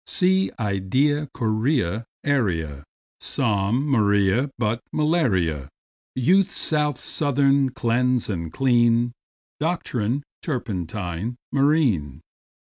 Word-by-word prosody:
Sea, 190 Hz, +1 st, +2 dB
idea, 130 Hz, +9 st, 0 dB
guinea, 110 Hz, -, 0 dB, 0.2 s
area, 85 Hz, -, -1 dB, 0.3 s
Psalm; 110 Hz, +1 st, 0 dB
Maria, 105 Hz, 0 st, +2 dB
but 115 Hz, 0 st, -1 dB
malaria; 95 Hz, -, 0 dB, 0.5 s
Youth, 180 Hz, +10 st, +2 dB
south, 150 Hz, -4 st, 0 dB
southern; 140 Hz, -2 st, +2 dB
cleanse 125 Hz, 0 st, +1 dB
and 85 Hz, -6 st, -4 dB
clean; 120 Hz, 0 st, +2 dB, 0.5 s
Doctrine, 140 Hz, -6 st, -1 dB, 0.2 s
turpentine, 105 Hz, -, -4 dB, 0.2 s
marine. 130 Hz, -, +1 dB
120 Hz, 80 wpm, -23 LUFS, 100-140 Hz, 0.5 s, Sea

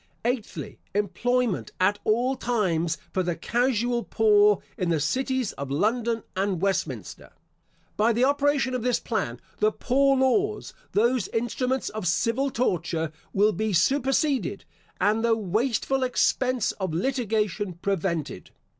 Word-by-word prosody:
Eighthly, 240 Hz, -2 st, -3 dB, 0.2 s
Employment, 220 Hz, +2 st, 0 dB
at 200 Hz, +3 st, +2 dB
all 245 Hz, +5 st, +1 dB
times, 175 Hz, -10 st, 0 dB, 0.2 s
for 190 Hz, -, +1 dB
the 175 Hz, -2 st, -1 dB
casual 240 Hz, +1 st, 0 dB
poor 210 Hz, -2 st, +4 dB
in 180 Hz, -, -1 dB
the 165 Hz, -2 st, +2 dB
cities 255 Hz, -, 0 dB
of 140 Hz, -1 st, -6 dB
London 225 Hz, -, 0 dB
and 190 Hz, -2 st, 0 dB
Westminster. 195 Hz, +1 st, -3 dB, 0.7 s
By 220 Hz, +3 st, +3 dB
the 235 Hz, +2 st, +1 dB
operation 285 Hz, -1 st, +2 dB
of 255 Hz, -, -1 dB
this 245 Hz, +1 st, +1 dB
plan, -, -, -3 dB, 0.2 s
the 430 Hz, 0 st, +3 dB
poor 275 Hz, -2 st, +2 dB
laws, 390 Hz, +12 st, +1 dB, 0.2 s
those 235 Hz, +1 st, +2 dB
instruments 250 Hz, +3 st, -1 dB
of 215 Hz, -4 st, -4 dB
civil 230 Hz, +10 st, +1 dB
torture, 170 Hz, -9 st, -1 dB, 0.2 s
will 205 Hz, +2 st, +3 dB
be 215 Hz, 0 st, -1 dB
superseded, 270 Hz, -, +1 dB, 0.3 s
and 215 Hz, +2 st, +2 dB
the 230 Hz, -1 st, +3 dB
wasteful 230 Hz, +6 st, 0 dB
expense 255 Hz, -1 st, +1 dB
of 185 Hz, -5 st, -2 dB
litigation 210 Hz, -3 st, -1 dB
prevented. 170 Hz, -3 st, -3 dB
225 Hz, 130 wpm, -26 LUFS, 195-255 Hz, 0.7 s, poor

